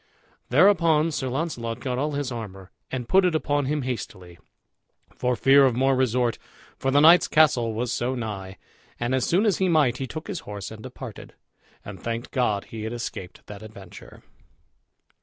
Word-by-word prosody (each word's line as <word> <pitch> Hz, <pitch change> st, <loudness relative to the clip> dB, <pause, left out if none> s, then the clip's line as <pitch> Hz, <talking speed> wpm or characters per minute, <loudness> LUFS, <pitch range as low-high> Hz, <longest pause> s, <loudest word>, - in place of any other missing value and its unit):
Thereupon 165 Hz, 0 st, +4 dB
Sir 135 Hz, -3 st, -3 dB
Launcelot 125 Hz, -4 st, -3 dB
got 125 Hz, -1 st, -3 dB
all 150 Hz, +2 st, -1 dB
his 140 Hz, -2 st, -3 dB
armor, 95 Hz, -5 st, -8 dB, 0.2 s
and 125 Hz, -3 st, -4 dB
put 190 Hz, +1 st, +4 dB
it 180 Hz, -3 st, +2 dB
upon 145 Hz, -2 st, 0 dB
him 150 Hz, 0 st, -1 dB
hastily, 95 Hz, -8 st, -6 dB, 0.8 s
for 125 Hz, 0 st, 0 dB
fear 135 Hz, +4 st, +5 dB
of 130 Hz, -3 st, +3 dB
more 135 Hz, +2 st, +2 dB
resort, 125 Hz, -2 st, +1 dB, 0.4 s
for 135 Hz, -, -2 dB
the 140 Hz, +2 st, +4 dB
knight's 165 Hz, +3 st, +7 dB
castle 125 Hz, -8 st, +3 dB
was 120 Hz, +1 st, -2 dB
so 125 Hz, +2 st, -1 dB
nigh. 100 Hz, -5 st, -6 dB, 0.4 s
And 120 Hz, +2 st, -1 dB
as 130 Hz, -1 st, +1 dB
soon 190 Hz, +6 st, +2 dB
as 205 Hz, -6 st, +2 dB
he 190 Hz, -1 st, +2 dB
might, 145 Hz, -7 st, +3 dB
he 135 Hz, -, -4 dB
took 155 Hz, +3 st, -7 dB
his 185 Hz, -, -4 dB
horse 100 Hz, -7 st, -7 dB
and 110 Hz, -1 st, -10 dB
departed, 130 Hz, -2 st, -10 dB, 0.5 s
and 100 Hz, -1 st, -9 dB
thanked 115 Hz, +1 st, -4 dB
God 110 Hz, -6 st, 0 dB
he 110 Hz, -, -8 dB
had 110 Hz, +2 st, -4 dB
escaped 105 Hz, -6 st, -7 dB
that 105 Hz, -1 st, -10 dB
adventure. 105 Hz, -3 st, -13 dB
125 Hz, 175 wpm, -25 LUFS, 115-150 Hz, 0.8 s, knight's